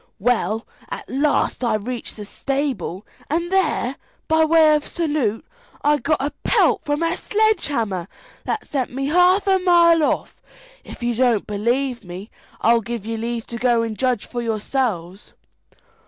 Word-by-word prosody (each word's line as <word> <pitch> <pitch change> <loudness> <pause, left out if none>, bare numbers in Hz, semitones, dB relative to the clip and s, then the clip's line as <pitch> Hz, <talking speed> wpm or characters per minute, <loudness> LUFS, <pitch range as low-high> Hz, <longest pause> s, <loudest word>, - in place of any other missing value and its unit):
Well, 220 -1 0 0.2
at - - -6
last 285 -1 0
I 230 -3 +2
reached 235 +3 -5
the 210 - -7
stable, 250 - -3 0.2
and 340 +4 -1
there, 310 -8 +1 0.3
by 320 0 +4
way 315 -1 +5
of 300 -1 0
salute, 290 -10 -1 0.4
I 295 0 +3
got 310 +1 +1
a 285 +2 -1
pelt - - +3
from 290 +2 -1
a 330 0 +1
sledge 435 +1 +1
hammer 205 -10 -2 0.4
that 435 - -2
sent 265 -4 -2
me 270 +2 -2
half 360 +5 +4
a 385 -1 +3
mile 340 -2 +5
off. - - -1 0.4
If - - -10
you 240 0 +1
don't 235 -3 +2
believe 240 +5 -1
me, 185 +4 -9 0.3
I'll 230 +1 +4
give 230 -1 -5
you 225 0 -3
leave 230 0 -3
to 235 - -6
go 240 -2 +3
and 225 -1 -3
judge 250 -2 0
for 240 - -4
yourselves." 215 -5 -2
255 Hz, 160 wpm, -21 LUFS, 225-310 Hz, 0.4 s, way